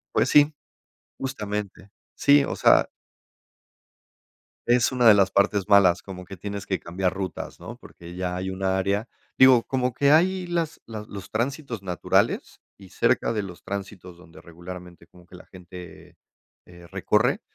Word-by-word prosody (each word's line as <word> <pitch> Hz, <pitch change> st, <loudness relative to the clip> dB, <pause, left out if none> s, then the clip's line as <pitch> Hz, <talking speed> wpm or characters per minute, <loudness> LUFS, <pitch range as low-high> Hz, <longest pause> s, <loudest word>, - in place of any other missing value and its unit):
Pues, -, -, +3 dB
sí, 150 Hz, +1 st, +5 dB, 0.7 s
justamente. 105 Hz, -6 st, -5 dB, 0.2 s
Sí, 145 Hz, 0 st, +4 dB
o -, -, -4 dB
sea -, -, +4 dB, 1.8 s
es 120 Hz, +1 st, +3 dB
una 125 Hz, -2 st, +3 dB
de 110 Hz, -, +9 dB
las 95 Hz, -1 st, +3 dB
partes 100 Hz, 0 st, +1 dB
malas, 100 Hz, -4 st, +4 dB
como 90 Hz, -2 st, -9 dB
que 95 Hz, +2 st, -10 dB
tienes 100 Hz, +1 st, -6 dB
que 95 Hz, -, -1 dB
cambiar 90 Hz, +1 st, -2 dB
rutas, 95 Hz, -1 st, -6 dB
¿no?, -, -, -9 dB
porque 85 Hz, 0 st, -13 dB
ya 90 Hz, -1 st, -3 dB
hay 95 Hz, +1 st, -4 dB
un 95 Hz, +1 st, -7 dB
área 95 Hz, +3 st, 0 dB, 0.3 s
digo, 130 Hz, -3 st, +6 dB
como 130 Hz, -2 st, -1 dB
que 140 Hz, 0 st, +3 dB
hay 180 Hz, +4 st, +3 dB
las 170 Hz, -2 st, -3 dB
las 110 Hz, -2 st, -8 dB
los 100 Hz, -1 st, -10 dB
tránsitos 125 Hz, 0 st, -3 dB
naturales 90 Hz, -2 st, -1 dB, 0.2 s
y 95 Hz, -2 st, -15 dB
cerca 115 Hz, -, +1 dB
de 110 Hz, -, -1 dB
los 90 Hz, -3 st, -10 dB
tránsitos 95 Hz, -2 st, -7 dB
donde 85 Hz, -2 st, -16 dB
regularmente 85 Hz, 0 st, -11 dB
como 90 Hz, -1 st, -20 dB
que 90 Hz, -, -23 dB
la 90 Hz, -, -15 dB
gente, 90 Hz, -1 st, -13 dB, 0.5 s
eh, 85 Hz, 0 st, -15 dB
recorre, -, -, 0 dB
100 Hz, 155 wpm, -24 LUFS, 90-120 Hz, 1.8 s, de